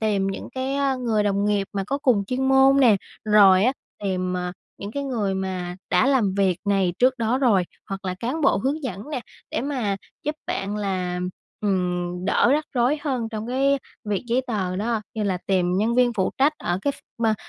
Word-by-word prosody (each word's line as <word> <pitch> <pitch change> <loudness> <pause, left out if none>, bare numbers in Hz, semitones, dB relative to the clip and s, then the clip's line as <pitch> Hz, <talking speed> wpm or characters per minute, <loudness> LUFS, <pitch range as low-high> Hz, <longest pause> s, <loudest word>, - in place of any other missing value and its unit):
tìm 205 -3 +1
những 195 - -4
cái, 265 +1 -2
a, 275 -1 +1
người 230 -4 0
đồng 200 -1 +1
nghiệp 205 -1 +1
mà 195 -2 -2
có 275 +5 -1
cùng 235 -8 +2
chuyên 260 +5 -1
môn 270 +1 +6
nè, 225 -6 +6 0.3
rồi 200 -2 +6
á 255 - +4 0.3
tìm, 185 -2 -1
à, 180 0 -3 0.3
những 200 - -6
cái 280 +2 -2
người 220 -8 -1
mà 185 -2 -3
đã - - +4
làm 245 -9 +2
việc 190 -3 +2
này 195 -3 +2
trước 255 +1 +3
đó 235 +3 +1
rồi, 210 -9 +3 0.2
hoặc 195 0 -5
là 185 -1 -2
cán 260 +8 -2
bộ 275 -8 +4
hướng 275 +9 -1
dẫn 230 +1 -5
nè 265 - -2 0.3
để - - -1
mà 250 -8 -1 0.3
giúp 300 - -1
bạn 200 +2 -2
là, 185 -3 -2 0.4
ừm, 180 -2 -1
đỡ 205 - +3
rắc 305 +1 +1
rối 250 +5 +2
hơn 255 -6 -1
trong 220 -1 -5
cái 275 +3 +2 0.3
việc 205 0 -1
giấy 240 +2 +1
tờ 190 -6 -2
đó, 220 +2 -1
như 215 - -2
là 190 -3 0
tìm 180 -2 +2
nhân 220 +4 +1
viên 245 -1 +4
phụ 190 -5 0
trách 285 +3 +4
ở 175 +1 -1
cái 285 - +1
ph - - -14 0.3
ma 220 -1 +3
210 Hz, 215 wpm, -24 LUFS, 195-260 Hz, 0.4 s, môn